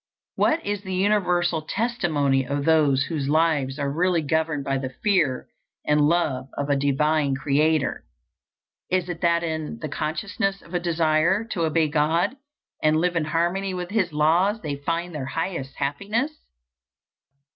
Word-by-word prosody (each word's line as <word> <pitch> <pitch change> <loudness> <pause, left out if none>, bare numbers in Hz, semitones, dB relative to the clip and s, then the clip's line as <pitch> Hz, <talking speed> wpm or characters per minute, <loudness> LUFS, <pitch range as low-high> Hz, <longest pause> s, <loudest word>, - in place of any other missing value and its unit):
What 325 +1 +1
is 205 -1 -2
the 190 -2 -4
universal 180 -4 +1
testimony 155 - 0
of 140 +2 -3
those 150 -4 +4
whose 145 -3 -3
lives 150 -4 +1
are 140 -1 -1
really 175 0 +1
governed 155 -1 0
by 135 -1 -1
the 130 -1 -4
fear 155 -3 0 0.4
and 150 0 +3
love 145 -4 +1
of 145 0 -1
a - - +4
divine 145 +1 +1
Creator? 150 +2 +1 0.9
It 185 -1 0
is 175 -2 -5
that 170 -1 +2
in 160 -6 -3
the 155 - -5
consciousness 195 +7 -2
of 170 - -15
a 175 - +1
desire 170 +3 +2
to 170 -4 0
obey 160 0 +2
God 160 - +1 0.5
and 155 0 +3
live 175 +2 +1
in 165 -2 +1
harmony 175 +5 -1
with 180 0 -5
His 195 -5 +1
laws 170 +8 +2
they 145 -2 -2
find 170 +4 -3
their 140 -4 -4
highest 165 -4 -4
happiness. 200 - -1
160 Hz, 155 wpm, -24 LUFS, 145-180 Hz, 0.9 s, those